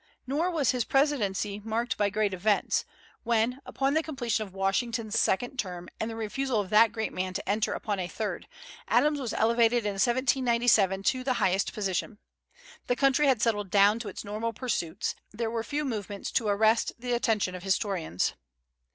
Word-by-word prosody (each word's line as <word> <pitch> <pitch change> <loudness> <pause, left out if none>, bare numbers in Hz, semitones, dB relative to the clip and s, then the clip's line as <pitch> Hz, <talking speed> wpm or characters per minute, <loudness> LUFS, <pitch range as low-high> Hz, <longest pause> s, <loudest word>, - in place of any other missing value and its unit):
Nor 295 +7 0
was 300 -8 +1
his 250 -2 0
presidency 210 -8 0
marked 230 +2 -1
by 205 -1 +1
great 205 -1 0
events, 200 +3 +1 0.4
when, 235 +3 0
upon 275 +1 0
the 315 - +3
completion 240 -8 -2
of - - -16
Washington's 220 +3 0
second 245 +7 0
term, 180 -6 -4
and 220 - -2
the 225 - -6
refusal 225 +2 -1
of 195 -3 -4
that 220 +1 +6
great 220 -1 -3
man 185 0 -3
to 195 - -4
enter 210 +2 +1
upon 205 -3 -3
a 180 - -2
third, 215 +3 -4 0.4
Adams 295 -1 +3
was 245 -5 -3
elevated 230 0 +2
in 205 - +1
1797 240 -5 +2
to 255 +4 +1
the 260 0 +1
highest 195 -3 +1
position. 200 +1 -2 0.7
The 245 - +2
country 275 +2 +3
had 255 -5 +3
settled 205 -4 0
down 205 +3 +4
to 230 - -5
its - - -7
normal 215 +3 -3
pursuits. 210 -9 -2 0.2
There 225 +1 -3
were 230 -1 -2
few 295 +5 -2
movements 205 -5 -4
to 225 - 0
arrest 220 +2 +3
the 245 +1 -3
attention 225 -6 +1
of 180 - -7
historians. 190 - -1
225 Hz, 175 wpm, -28 LUFS, 200-245 Hz, 0.7 s, that